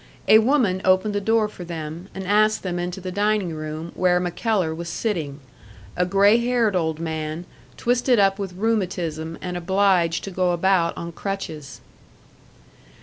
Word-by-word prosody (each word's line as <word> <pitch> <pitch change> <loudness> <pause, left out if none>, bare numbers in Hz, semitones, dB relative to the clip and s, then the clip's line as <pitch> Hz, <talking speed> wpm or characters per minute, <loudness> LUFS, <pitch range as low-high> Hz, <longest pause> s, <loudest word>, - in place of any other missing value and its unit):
A 220 - +8
woman 220 -6 +2
opened 185 +3 +3
the 205 - -1
door 225 +1 +2
for 195 -4 -10
them, 165 +1 -6
and 190 0 -5
asked 215 +2 +2
them 180 -2 -3
into 180 +2 -4
the 185 0 -6
dining 205 -2 0
room 155 +2 -6
where 180 -1 +2
MacKellar 180 -1 -1
was 170 +1 -6
sitting 160 -7 -3 0.6
a 180 0 +1
grey 200 +3 +5
haired 235 -4 +1
old 160 -3 -1
man, 160 0 -4 0.3
twisted 245 +1 +2
up 195 -1 +3
with 195 -2 -4
rheumatism 175 -7 -2
and 180 -1 -4
obliged 180 -1 +2
to 195 - -6
go 180 -1 +1
about 175 -1 +1
on 170 0 -5
crutches. 160 -6 -6
185 Hz, 155 wpm, -23 LUFS, 170-205 Hz, 0.6 s, A